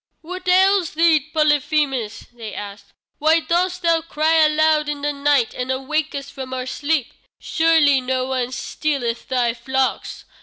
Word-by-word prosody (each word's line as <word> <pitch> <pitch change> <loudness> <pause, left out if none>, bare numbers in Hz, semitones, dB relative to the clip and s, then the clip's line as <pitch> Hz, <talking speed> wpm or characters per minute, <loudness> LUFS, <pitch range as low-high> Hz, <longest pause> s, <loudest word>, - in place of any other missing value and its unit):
"What 365 +3 -8
ails 375 -2 +3
thee, 325 -1 +4
Polyphemus?" 295 -6 0
they 225 -3 -8
asked. 200 0 -9 0.3
"Why 315 +2 +4
dost 360 +2 -1
thou 335 -1 +2
cry 320 0 +1
aloud 305 0 +2
in 290 -1 -5
the 295 0 0
night 280 -4 +1
and 250 0 -5
awake 285 +4 -2
us 280 0 -5
from 260 -2 -7
our 255 -1 -4
sleep? 285 0 -2 0.3
Surely 320 -5 +3
no 255 0 -1
one 255 -1 -2
stealeth 250 -2 -3
thy 245 -3 0
flocks? 265 +2 -3
290 Hz, 150 wpm, -20 LUFS, 260-320 Hz, 0.3 s, thee